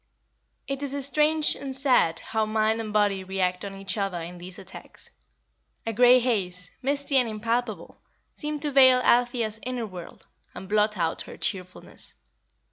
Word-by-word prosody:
It 275 0 -3
is 280 -1 -1
strange 300 +2 +3
and 270 -1 -6
sad 250 - +2
how 220 -1 -1
mind 220 +1 +1
and 215 -1 -6
body 205 -2 +1
react 185 -1 -1
on 200 -1 -6
each 195 +1 -3
other 195 -3 -1
in 175 +1 -8
these 180 +1 -9
attacks. 190 0 -11 0.7
A 225 - -2
grey 245 +3 +7
haze, 185 -8 -1
misty 280 +1 0
and 250 -3 +3
impalpable, 220 -3 -3 0.3
seemed 300 -1 -3
to 295 - -1
veil 260 -2 +7
Althea's 240 -3 +2
inner 250 -2 -3
world, 180 -4 -10 0.3
and 190 - -8
blot 210 +1 +2
out 165 -2 -1
her - - -10
cheerfulness. 185 -1 -5
220 Hz, 155 wpm, -26 LUFS, 190-260 Hz, 0.7 s, grey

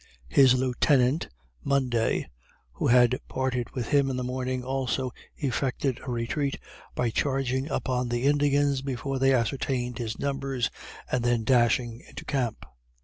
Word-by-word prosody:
His 130 - +6
Lieutenant, 130 +2 +2 0.4
Munday, 125 -5 +1 0.5
who 65 - -1
had 125 +1 +5
parted 125 -2 -2
with 120 -3 -3
him 140 -1 +3
in 130 - -2
the 125 - -2
morning, 130 0 -2
also 130 0 -1 0.3
effected 130 -1 -1
a - - -6
retreat, 130 +4 -1 0.4
by 120 -2 0
charging 135 +1 0
upon 125 -3 -1
the 120 +1 -1
Indians, 145 -1 +2
before 135 0 -3
they 135 +1 +4
ascertained 125 0 0
his 115 -2 -3
numbers, 135 -3 -1 0.4
and 125 -2 +1
then 120 -2 +2
dashing 120 0 +2
into - - -9
camp. 125 -5 -2
130 Hz, 140 wpm, -27 LUFS, 120-135 Hz, 0.5 s, His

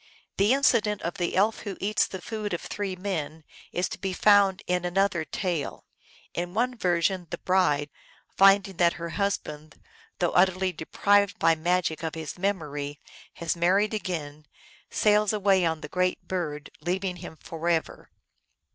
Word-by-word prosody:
The 200 +3 +4
incident 235 -7 +2
of 170 +2 -4
the 175 - -1
Elf 210 +4 +2
who 200 -2 -6
eats 210 +2 +1
the 190 -2 -8
food 215 -3 -4
of - - -6
three 200 -2 -4
men 165 -5 -4 0.3
is 180 +1 0
to - - -7
be 190 -2 -2
found 200 -1 +4
in 180 0 0
an 175 +1 -3
other 195 -4 +2
tale. 165 +1 -3 0.5
In 175 +2 -4
one 250 +3 +1
version, 180 -3 0
the 175 - -4
bride, 150 -7 +1 0.4
finding 195 -1 +5
that 170 -1 +4
her 170 0 -6
husband, 155 -6 -3 0.4
though 175 - +1
utterly 185 0 +3
deprived 200 +5 +2
by 165 - +4
magic 165 0 0
of 160 -1 -4
his 160 -2 -6
memory, 150 -7 -3 0.3
has 170 0 -2
married 190 +6 +2
again, 155 -8 -4 0.4
sails 210 0 +3
away 195 -3 +3
on 160 -1 -2
the - - -6
great 180 +3 -1
bird, 155 -5 -4
leaving 180 +1 -2
him 170 -2 -9
forever. 165 0 -2
180 Hz, 155 wpm, -27 LUFS, 165-200 Hz, 0.5 s, finding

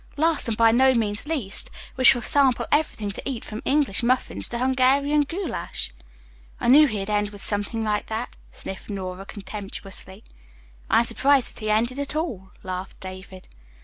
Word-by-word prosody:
"Last, 320 -2 +2
and 225 -2 -1
by 230 -1 +5
no 260 +2 +4
means 215 +2 -1
least, 265 -12 -1 0.3
we 260 - -2
shall 245 -2 +7
sample 270 -2 +4
everything 290 -9 0
to 200 - -6
eat 245 -4 -5
from 215 +1 -6
English 275 -8 +1
muffins 250 +2 0
to 240 - -4
Hungarian 265 +3 +3
goulash." 330 - -3 0.7
"I - - 0
knew 295 +4 +8
he'd 205 -5 -3
end 210 -1 0
with 205 -1 -9
something 205 +2 +2
like 210 -1 -1
that," 225 +2 -4 0.2
sniffed 190 - -6
Nora 190 -1 -6
contemptuously. 195 -1 -7 0.7
"I - - +4
am - - -1
surprised 270 +3 +2
that - - -10
he 215 -1 -3
ended 235 +5 +1
at 285 +1 -3
all," 240 - -3
laughed 185 0 -6
David. 185 0 -10
230 Hz, 170 wpm, -24 LUFS, 205-270 Hz, 0.7 s, knew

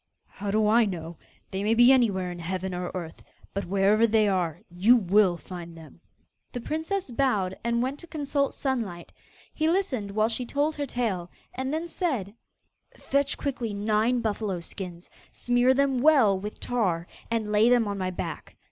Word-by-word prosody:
'How 205 - -7
do 215 +1 +2
I 225 +2 +5
know? 170 -4 -6 0.3
They 190 - -2
may 220 +2 +2
be 240 +2 +7
anywhere 200 -9 +2
in 175 - -8
heaven 185 +2 -3
or 180 0 -3
earth; 170 -3 -6 0.3
but, 200 - -3
wherever 200 +4 +3
they 220 -1 +3
are, 180 -5 -1
you 190 +8 +4
will 200 -3 +3
have - - -15
to - - -25
find 170 -2 -8
them.' 160 0 -14 0.5
The 245 - -3
princess 320 +5 -3
bowed 210 -8 +1
and 235 +1 +1
went 270 +3 -3
to 340 - -11
consult 285 -3 -1
Sunlight. 225 -11 -3 0.4
He 315 0 +1
listened 315 - 0
while 215 +2 +2
she 235 +2 -1
told 290 +5 -1
her 285 -1 -2
tale, 205 -9 -2 0.2
and 260 +1 -3
then 320 +3 -2
said: 265 - -2 0.6
'Fetch 280 0 0
quickly 245 -7 -3
nine 215 +4 +1
buffalo 210 -4 -2
skins; 175 0 -8 0.2
smear 245 +1 +2
them 270 -1 +2
well 270 -9 +5
with 210 +2 -7
tar, 185 -9 -1 0.2
and 225 -2 -1
lay 210 +3 +4
them 240 -3 +4
on 200 -1 -3
my 185 -1 -1
back. 185 - -6
215 Hz, 180 wpm, -27 LUFS, 190-255 Hz, 0.6 s, be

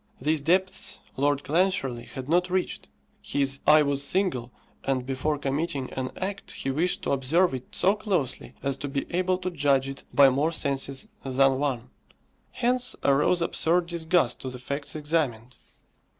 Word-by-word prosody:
These 155 +3 +1
depths 190 +4 +1 0.2
Lord 145 +1 +1
Clancharlie 155 -7 0
had 130 -1 -6
not 180 +3 +2
reached. 185 0 -2 0.3
His 140 -1 -1
"eye 150 0 +7
was 140 -1 0
single," 155 -10 0 0.3
and 130 -2 -1
before 135 +3 -1
committing 140 -1 -2
an 130 -1 -3
act 195 +1 -5
he 135 - -3
wished 165 +6 0
to - - -1
observe 145 +6 +2
it 130 -1 -5
so 195 - +4
closely 190 - -2
as 140 -1 -1
to 145 - -5
be 140 0 -2
able 185 0 +1
to 185 0 -4
judge 140 -4 +2
it 135 0 -7
by 140 -1 +7
more 145 +5 +1
senses 140 +1 0 0.2
than 135 0 +2
one. 130 -4 -2 0.6
Hence 250 0 0
arose 150 +5 +3
absurd 170 +1 +1
disgust 165 -6 +1
to 130 - -4
the 125 - -7
facts 140 +5 -5
examined. 145 -6 -1
145 Hz, 160 wpm, -26 LUFS, 135-175 Hz, 0.6 s, eye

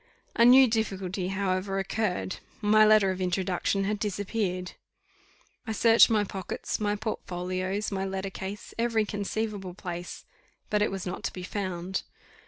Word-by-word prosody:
A 235 - +5
new 260 +2 +8
difficulty, 195 -5 -2
however, 195 0 -1
occurred: 195 -1 -1 0.2
my 215 0 +5
letter 215 -3 +5
of 185 0 -4
introduction 185 +1 0
had 205 +1 -1
disappeared. 200 -3 -2 1.0
I 220 - -1
searched 225 +1 +6
my 215 -2 +3
pockets, 190 -2 -4
my 210 -1 0
portfolios, 185 -1 -3
my 190 -1 -1
letter 190 0 -3
case, 195 +2 -7
every 230 -2 +2
conceivable 205 -2 -3
place, 175 -2 -6 0.5
but 210 -1 +2
it 210 - +3
was 195 -1 -5
not 180 - -5
to - - -2
be 180 - -7
found. 185 -1 -3
195 Hz, 145 wpm, -28 LUFS, 185-215 Hz, 1.0 s, new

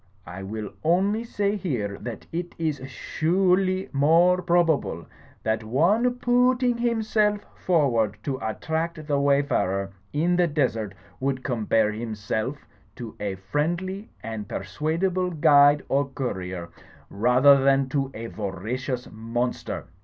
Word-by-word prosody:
I 90 +4 -8
will 105 +2 -5
only 195 +7 +2
say 205 -3 -1
here 120 - -2
that 120 - -7
it 175 +1 -4
is 155 -3 -1
su 155 - -2 0.2
urely 185 -1 -1
more 165 +6 +4
probabte 170 - +1 0.4
that 110 0 0
one 190 - +2
poo 245 +1 +3
ooting 245 -1 0
himself 215 -3 +1
forward 120 - +1
to 135 -2 -2
attract 160 +8 -3
the 145 -2 +1
wayfarer 140 -9 +1 0.2
in 170 +4 +1
the 175 -1 +4
desert, 115 - -1 0.2
would 130 -1 -1
compare 110 -3 +1
himself 110 +4 -4 0.3
to 120 -4 -8
a 100 -2 -2
friendly 175 - -2
and 110 -2 -5
persuadable 165 - -1
guide 145 -3 +5
or 140 +1 +1
courier, 95 -10 -4 0.4
rather 125 +6 +5
thad 135 -1 +2
to 135 -1 0
a 115 - -6
voracious 115 +5 -4
monster. 115 +3 -3
140 Hz, 125 wpm, -25 LUFS, 110-175 Hz, 0.4 s, guide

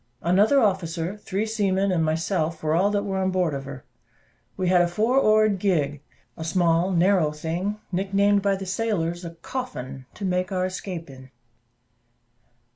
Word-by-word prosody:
Another 205 +11 +4
officer, 185 -4 0
three 205 0 -3
seamen, 200 -3 0
and 170 -3 +1
myself, 160 0 -1
were 155 0 +1
all 185 +5 +3
that 205 -1 0
were 195 -2 -2
on 190 0 +1
board 180 -4 0
of 135 0 -5
her. 130 -1 -9 0.7
We 185 -1 -1
had 180 -1 +5
a 175 - +3
four 220 +9 +2
oared 215 -4 +3
gig, 150 -8 0 0.3
a 160 - -6
small 170 +1 +2
narrow 180 -3 +3
thing 170 +7 -3
(nick 190 +2 -2
named 200 +1 +3
by 200 0 +2
the 195 0 -6
sailors 185 -4 -1
a 170 -1 -7
"coffin"), 135 - -6
to 200 - -5
make 185 +1 -1
our 185 -1 0
escape 185 -2 -5
in. 130 -1 -13
185 Hz, 170 wpm, -24 LUFS, 165-200 Hz, 0.7 s, had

